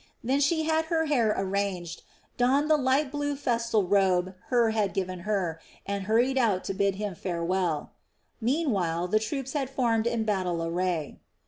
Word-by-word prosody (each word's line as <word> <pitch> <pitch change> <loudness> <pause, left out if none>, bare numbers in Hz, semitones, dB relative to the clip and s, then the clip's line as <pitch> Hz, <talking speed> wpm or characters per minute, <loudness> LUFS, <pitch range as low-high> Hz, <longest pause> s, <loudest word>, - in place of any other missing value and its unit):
Then 265 +4 +1
she 315 +3 +2
had 320 0 +1
her 320 0 0
hair 245 -8 +2
arranged, 190 -3 -2 0.3
donned 275 +5 +2
the - - +7
light 270 0 +1
blue 290 -1 -2
festal 235 -5 0
robe 190 -1 +2
Hur 235 -3 +3
had 210 -3 0
given 185 -1 -2
her, 175 -6 -1 0.2
and 200 -1 -3
hurried 240 +5 +2
out 210 -7 +2
to - - -3
bid 200 0 +1
him 205 -1 -3
farewell. 170 -2 -2 0.5
Meanwhile 200 - 0
the 215 - +3
troops 265 +4 -4
had 275 -4 -1
formed 235 -4 +1
in 230 -1 0
battle 185 -5 -1
array. 170 -2 -2
215 Hz, 160 wpm, -27 LUFS, 185-265 Hz, 0.5 s, the